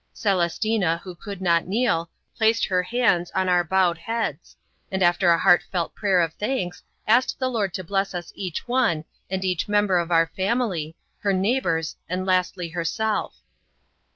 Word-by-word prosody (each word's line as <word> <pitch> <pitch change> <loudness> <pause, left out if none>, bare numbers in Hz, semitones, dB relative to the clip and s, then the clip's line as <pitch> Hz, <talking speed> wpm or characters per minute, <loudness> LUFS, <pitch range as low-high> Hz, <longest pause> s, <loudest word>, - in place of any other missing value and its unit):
Celestina 190 -1 +1
who 185 - -8
could 195 +1 -8
not 170 -2 +2
kneel, 190 -6 0 0.3
placed 225 0 +2
her 185 -2 +1
hands 185 -4 +1
on 190 0 +1
our 180 -1 +3
bowed 175 -1 +2
heads, 225 +5 -4 0.4
and 190 0 0
after 175 +1 +3
a 170 - +5
heartfelt 175 0 +2
prayer 195 -4 +2
of 165 -2 -1
thanks 205 -5 -3 0.3
asked 240 +4 +3
the 260 - 0
Lord 210 -6 0
to 185 - -4
bless 195 +1 -1
us 175 -1 -5
each 185 0 -5
one 230 -11 +1 0.2
and 190 0 -2
each 180 -3 -1
member 205 -3 +3
of 170 0 -2
our 165 -1 +3
family, 190 -6 -1 0.2
her 200 -1 +1
neighbors, 185 -5 0
and 185 +2 -2
lastly 185 -1 0
herself. 175 +6 -2
185 Hz, 160 wpm, -24 LUFS, 170-210 Hz, 0.4 s, a